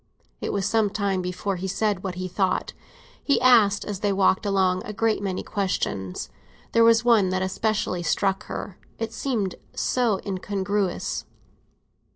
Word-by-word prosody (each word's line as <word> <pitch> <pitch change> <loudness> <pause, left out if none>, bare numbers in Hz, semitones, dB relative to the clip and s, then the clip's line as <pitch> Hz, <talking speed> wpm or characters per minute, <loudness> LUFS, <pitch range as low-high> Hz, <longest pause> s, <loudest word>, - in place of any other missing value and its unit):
It - - -2
was 195 -2 -1
some 220 0 +2
time 200 -2 -1
before 180 +2 -3
he 190 +2 -4
said 205 0 0
what 190 -2 -3
he 185 0 -4
thought: 185 +1 -1 0.5
he 280 - +3
asked, 225 -5 +5
as 205 -3 -4
they 205 0 +1
walked 195 +1 +2
along, 190 -2 +2
a 210 - -6
great 220 0 +1
many 190 -2 -2
questions. 100 - -2 0.4
There 230 - +5
was 230 0 +5
one 220 -6 +5
that 185 0 0
especially 190 -1 -1
struck 195 +3 0
her; 190 - -6 0.2
it 225 0 -4
seemed 225 -7 -1 0.2
so 235 -6 +1
incongruous. 195 0 -2
200 Hz, 155 wpm, -25 LUFS, 185-215 Hz, 0.5 s, asked